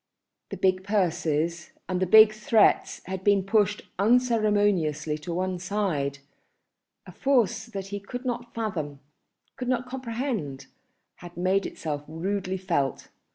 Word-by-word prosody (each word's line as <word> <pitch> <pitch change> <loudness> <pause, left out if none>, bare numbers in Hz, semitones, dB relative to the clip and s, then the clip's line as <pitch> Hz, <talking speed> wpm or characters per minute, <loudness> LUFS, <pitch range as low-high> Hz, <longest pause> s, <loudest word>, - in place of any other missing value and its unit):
The - - -6
big 185 0 +2
purses 170 -4 0
and 185 -1 -1
the 185 - +2
big 215 +2 +8
threats 215 0 +2
had 190 0 -5
been 200 -1 +4
pushed 205 +1 +1 0.2
unceremoniously 205 - +2
on 170 - -2
one 185 0 -2
side; 180 -8 -1 0.9
a - - -10
force 240 -5 +1
that 195 -4 -6
he 205 0 -4
could 245 +6 -7
not 240 -1 -3
fathom, 160 -11 -3 0.6
could 250 - -4
not 250 0 0
comprehend, 230 - -4 0.5
had 175 -1 -12
made 185 +2 +1
itself 150 -2 -5
rudely 190 +4 -2
felt. 145 -7 -1
195 Hz, 130 wpm, -26 LUFS, 170-220 Hz, 0.9 s, big